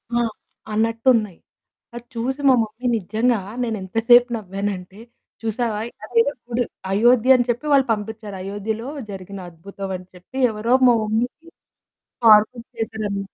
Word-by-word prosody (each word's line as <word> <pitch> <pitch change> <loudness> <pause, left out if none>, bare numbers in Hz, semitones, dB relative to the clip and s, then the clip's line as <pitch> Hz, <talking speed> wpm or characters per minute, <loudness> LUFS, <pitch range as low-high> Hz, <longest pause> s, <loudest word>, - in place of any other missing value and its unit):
ఆ! - - +3 0.5
అన్నట్టున్నాయి. 225 -3 +2 0.6
అది 240 - -8
చూసి 260 +5 -2
మా - - +7
మమ్మీ 225 +3 -5
నిజంగా 220 +4 0 0.2
నేను 225 -2 -2
ఎంత 190 +3 -8
సేపు 245 +1 +8
నవ్వానంటే, 195 -1 -5 0.4
చూసావా 225 -1 -1
అయోధ్య 230 +3 0
చూడు, 245 0 -1 0.3
అయోధ్య 240 +5 +5
అని 245 - 0
చెప్పి 240 +6 -1
వాళ్ళు 270 -2 +4
పంపించారు. 210 -1 -6
అయోధ్యలో 210 +5 -4 0.2
జరిగిన 195 0 -8
అద్భుతం 195 +3 -8
అని 180 0 -14
చెప్పి 185 +9 -12
ఎవరో 220 +3 0
మా 240 - +6
మమ్మీకి 245 +10 -2 0.7
ఫార్‌వర్డ్ 220 +2 +5
చేశారనమాట. 205 -3 -4
220 Hz, 130 wpm, -22 LUFS, 200-240 Hz, 0.7 s, సేపు